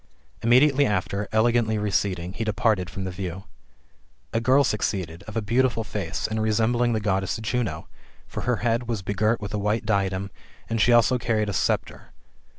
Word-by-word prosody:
Imme 120 +2 +6
diately 145 0 +4
after, 100 -2 -1
elegantly 110 0 +2
receding, 95 -3 -1
he 115 - -3
departed 105 -3 +1
from 95 +3 -6
the 95 - -3
view. 90 0 -5 0.9
A 115 - +1
girl 130 +4 +4
succeedal, 95 - -2
of 110 - -5
a 110 - 0
beautiful 120 +1 +1
face, 100 -6 -4
and 110 0 -1
resembling 115 +2 +2
the 110 - +1
Goddess 95 -2 -1
Juno: 110 -7 -2 0.4
for - - -6
her 125 0 +1
head 120 +1 +1
was 110 -5 -2
begirt 105 +4 +1
with 105 0 -6
a 105 - -1
white 105 +3 0
diadem, 100 -2 0 0.4
and 115 -1 -1
she 120 - +4
also 120 +1 +4
carried 110 -3 0
a - - -2
sceptre. - - -2
110 Hz, 175 wpm, -25 LUFS, 95-115 Hz, 0.9 s, Imme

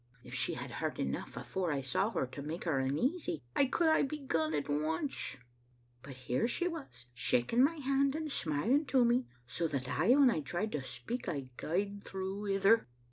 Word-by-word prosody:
If - - -10
she - - +1
had - - -6
heard - - -3
enough, 70 - -3
afore 185 -3 -2
I 140 -2 0
saw 135 - +1
her, 225 - -1
to 130 +3 -8
make 155 +5 -4
her 155 -6 +1
uneasy, 155 - 0
I 280 - +5
could 325 +5 +1
hae 315 - +5
begun 260 - -1
at 145 - -1
once; 155 - -1 0.6
but 135 0 -9
here 125 - 0
she 350 +8 0
was, 280 - -7
shaking 125 - +2
my 315 +5 +3
hand 275 -1 +1
and 310 -1 -3
smiling 230 - +1
to 255 -2 +4
me, 245 +2 +2 0.2
so 165 +7 -1
that 135 -4 -3
aye 155 - +4
when 275 -3 +6
I 180 - 0
tried 175 +9 -2
to 150 - -2
speak 235 - -4
I 135 -4 -4
gaed 200 +7 -2
through 195 +2 -4
ither. 200 - +4
190 Hz, 190 wpm, -33 LUFS, -, 0.6 s, when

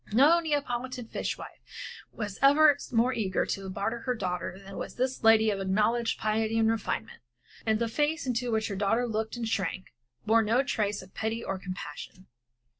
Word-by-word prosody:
No 290 +10 +6
Neapolitan 260 -5 -2
fish - - -3
wife - - -10 0.5
was 210 -3 -5
ever 290 +2 +7 0.2
more 245 +2 +3
eager 200 -6 0
to 195 -1 -4
barter 200 +5 -2
her 250 +1 -2
daughter 180 -3 -3
than 195 0 -11
was - - -6
this 255 0 -1
lady 220 -1 +6
of 200 - -2
acknowledged 215 +5 +1
piety 220 +1 0
and 225 0 +4
refinement, 225 - -3 0.5
and 220 0 +3
the 235 +1 0
face 295 +7 0
into 245 -1 -1
which 220 0 +1
her 200 - -3
daughter 210 +5 +1
looked 220 0 -2
and 235 -1 -3
shrank 190 -3 -2 0.3
from - - -38
bore 225 +1 +5
no 230 +5 +2
trace 210 -6 -1
of 185 - -17
pity 225 +1 -2
or 195 - -3
compassion. 185 0 -8
225 Hz, 185 wpm, -29 LUFS, 200-245 Hz, 0.5 s, ever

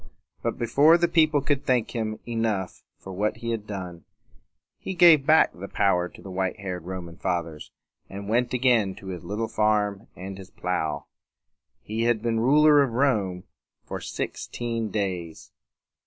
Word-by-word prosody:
But, - - -2
before 145 +8 +5
the 175 0 +2
people 155 -3 +3
could 140 0 0
thank 125 -3 +1
him 110 -2 -3
enough 115 -5 -2 0.2
for 95 - -10
what 105 +3 -1
he 115 0 -4
had 110 -2 -4
done, 90 -4 -6 0.8
he 190 - -5
gave 165 -5 +6
back 160 +1 +5
the 95 +3 -8
power 90 -3 +1
to - - -15
the 95 - -8
white 95 0 -2
haired 90 -4 -5
Roman 90 -2 -7
Fathers, 85 -4 -3 0.4
and 100 +1 -7
went 120 +3 +1
again 120 -6 +2
to 95 - -10
his 90 -2 -6
little 105 +6 -3
farm 105 -1 0
and 95 +1 -8
his 95 0 -11
plow. 90 -4 -3 0.8
He 110 +2 -2
had 115 -2 +1
been 115 -1 0
the - - +1
ruler 150 +3 +6
of 130 -4 0
Rome 105 -9 +1 0.4
for - - -6
sixteen 115 -2 -4
days. 90 -6 -4
105 Hz, 165 wpm, -25 LUFS, 95-120 Hz, 0.8 s, gave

